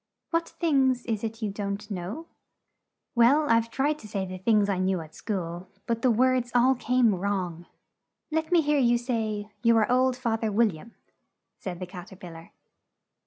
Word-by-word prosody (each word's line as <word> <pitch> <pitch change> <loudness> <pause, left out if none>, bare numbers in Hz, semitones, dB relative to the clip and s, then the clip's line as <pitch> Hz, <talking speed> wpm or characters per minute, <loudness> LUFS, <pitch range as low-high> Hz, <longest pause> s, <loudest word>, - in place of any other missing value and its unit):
"What 335 0 0
things 265 -7 +1
is 220 -2 -2
it 225 0 -4
you 210 - -1
don't 200 +1 -5
know?" 195 - -5 0.9
"Well, 265 +6 +4
I've 230 -1 +3
tried 290 +5 0
to 215 - -11
say 200 -2 -3
the 185 0 -7
things 210 +1 +3
I 195 -2 0
knew 185 0 +1
at 160 -1 -10
school, 175 -3 -4 0.2
but 230 -1 -1
the 255 - +3
words 250 +1 +2
all 250 +2 +5
came 245 -2 +2
wrong." 180 -3 -3 0.6
"Let 320 +2 -1
me 345 -2 +5
hear 295 -1 +2
you 240 -2 +4
say, 220 -4 -3
'You 230 -1 +4
are 220 +1 +2
old, 255 0 +3
Fath 230 -3 -1
er 220 - 0
Wil 225 +2 +4
liam,'" 175 +6 -11 0.7
said 180 -2 -6
the 185 - -4
Cat 180 +1 -10
er - - -10
pil 180 -2 -10
lar. 165 0 -13
225 Hz, 190 wpm, -27 LUFS, 190-255 Hz, 0.9 s, all